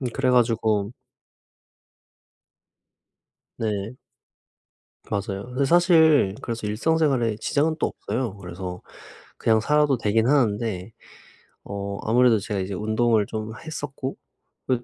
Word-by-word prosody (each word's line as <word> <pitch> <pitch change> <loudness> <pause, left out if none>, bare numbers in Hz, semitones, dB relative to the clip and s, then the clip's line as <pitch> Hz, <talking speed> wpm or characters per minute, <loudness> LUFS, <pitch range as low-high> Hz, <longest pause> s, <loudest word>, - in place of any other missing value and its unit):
음 130 - -2
그래 130 -2 +1
가지고 110 -3 +2 2.6
네. 105 +1 -3 1.2
맞아요. 100 +1 -3
근데 130 +3 -1
사실 160 - +5
그래서 115 -2 -4
일상 125 +10 0
생활에 130 -9 +1
지장은 150 +8 0
또 - - +2
없어요. 115 -4 -4
그래서 90 0 -7 0.5
그냥 110 -1 +2
살아도 150 0 +2
되긴 110 +3 +1
하는데 110 -6 0 0.7
어 100 0 -5
아무래도 120 0 +4
제가 105 -1 -3
이제 95 +1 -4
운동을 110 +2 +1
좀 110 +1 -5
했었고 140 -4 -6 0.5
그리고 125 -2 0
115 Hz, 245 characters per minute, -24 LUFS, 105-130 Hz, 2.6 s, 사실